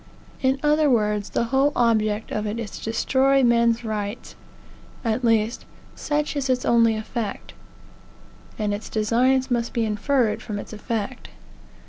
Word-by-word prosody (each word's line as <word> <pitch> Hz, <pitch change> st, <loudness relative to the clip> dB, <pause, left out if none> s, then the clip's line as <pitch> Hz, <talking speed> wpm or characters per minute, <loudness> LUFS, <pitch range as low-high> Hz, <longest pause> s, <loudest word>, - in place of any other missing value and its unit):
In 265 Hz, +1 st, +2 dB
other 300 Hz, 0 st, +3 dB
words, 210 Hz, -4 st, +1 dB
the -, -, 0 dB
whole 275 Hz, +2 st, +4 dB
object 220 Hz, -2 st, +1 dB
of 210 Hz, 0 st, -2 dB
it 210 Hz, +2 st, -3 dB
is 230 Hz, -4 st, -5 dB
to -, -, -9 dB
destroy 265 Hz, +4 st, +2 dB
men's 235 Hz, 0 st, +3 dB
rights. 210 Hz, 0 st, -4 dB, 0.7 s
At 225 Hz, +2 st, 0 dB
least, 225 Hz, 0 st, +1 dB, 0.3 s
such 295 Hz, 0 st, -2 dB
is 275 Hz, -2 st, -2 dB
its 250 Hz, -1 st, +1 dB
only 230 Hz, -1 st, +4 dB
effect; 215 Hz, -1 st, -5 dB, 1.0 s
and 210 Hz, -2 st, -1 dB
its 205 Hz, +2 st, -6 dB
designs 250 Hz, +5 st, +1 dB
must 240 Hz, -1 st, 0 dB
be 230 Hz, -1 st, 0 dB
inferred 220 Hz, +2 st, 0 dB
from 210 Hz, -, -5 dB
its 200 Hz, -, -8 dB
effect. 215 Hz, -1 st, -4 dB
230 Hz, 145 wpm, -23 LUFS, 215-260 Hz, 1.0 s, whole